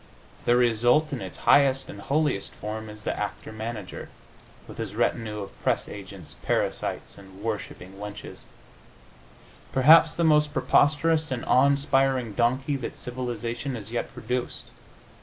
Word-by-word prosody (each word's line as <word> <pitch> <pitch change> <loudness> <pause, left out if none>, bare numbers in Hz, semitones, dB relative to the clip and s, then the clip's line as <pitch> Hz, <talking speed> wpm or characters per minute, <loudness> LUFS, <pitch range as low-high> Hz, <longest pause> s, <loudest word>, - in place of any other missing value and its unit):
The 120 - +4
result, 120 +5 +3
in 130 - -3
its - - -7
highest 135 -2 +5
and 100 - -9
holiest 145 -5 0
form 110 +1 -6
is 105 0 -11
the - - -2
actor 105 +1 -5
manager, 110 -3 -6 0.6
with - - -11
his 105 -3 -4
retinue 110 -2 -1
of 100 - -10
press - - +1
agents, - - -8
parasites - - -2
and 95 0 -14
worshipping 100 -3 -5
wenches 105 0 -8 1.3
perhaps 160 +4 +6
the 170 - 0
most 150 -2 +4
preposterous 155 +2 +3
and 130 -2 -3
awe 130 +2 +5
inspiring 135 -4 +2
donkey 130 +5 +1
that 130 - -6
civilization 125 +1 -4
has 110 -1 -8
yet 120 - -3
produced. 125 +2 -4
120 Hz, 140 wpm, -26 LUFS, 110-140 Hz, 1.3 s, perhaps